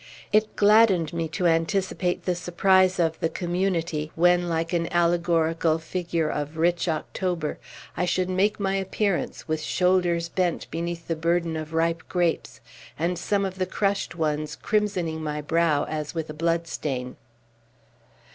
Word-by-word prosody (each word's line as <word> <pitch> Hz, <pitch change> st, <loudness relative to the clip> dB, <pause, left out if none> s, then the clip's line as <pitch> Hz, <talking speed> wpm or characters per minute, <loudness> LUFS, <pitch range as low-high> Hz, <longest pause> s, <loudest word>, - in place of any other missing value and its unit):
It 215 Hz, 0 st, +2 dB
gladdened 205 Hz, -6 st, +4 dB
me 165 Hz, -1 st, -1 dB
to 160 Hz, +3 st, -3 dB
anticipate 175 Hz, +2 st, +1 dB
the 180 Hz, -, +1 dB
surprise 185 Hz, +2 st, +3 dB
of 165 Hz, -1 st, +1 dB
the 165 Hz, -, 0 dB
Community, 170 Hz, -4 st, -1 dB
when, 175 Hz, +1 st, +3 dB
like 165 Hz, +1 st, -1 dB
an 170 Hz, -1 st, 0 dB
allegorical 170 Hz, -2 st, +2 dB
figure 165 Hz, 0 st, -2 dB
of 150 Hz, +1 st, -3 dB
rich 170 Hz, +2 st, +1 dB
October, 165 Hz, 0 st, -2 dB, 0.4 s
I 180 Hz, -, 0 dB
should 180 Hz, +1 st, 0 dB
make 195 Hz, +3 st, +1 dB
my 195 Hz, -1 st, 0 dB
appearance, 195 Hz, 0 st, -2 dB
with 155 Hz, -1 st, -1 dB
shoulders 175 Hz, -1 st, +1 dB
bent 175 Hz, 0 st, -1 dB
beneath 170 Hz, +1 st, -4 dB
the 165 Hz, -, 0 dB
burden 170 Hz, 0 st, 0 dB
of 155 Hz, 0 st, -5 dB
ripe 165 Hz, 0 st, +1 dB
grapes, 175 Hz, -2 st, -1 dB, 0.4 s
and 170 Hz, +2 st, -1 dB
some 200 Hz, +2 st, 0 dB
of 190 Hz, 0 st, -5 dB
the 185 Hz, -, 0 dB
crushed 200 Hz, -3 st, -1 dB
ones 155 Hz, -2 st, -1 dB
crimsoning 185 Hz, -7 st, -1 dB
my 150 Hz, -1 st, -3 dB
brow 155 Hz, -1 st, +2 dB
as 155 Hz, +1 st, -4 dB
with 160 Hz, -2 st, -3 dB
a -, -, -8 dB
bloodstain. 155 Hz, -6 st, -2 dB
170 Hz, 145 wpm, -25 LUFS, 160-185 Hz, 0.4 s, gladdened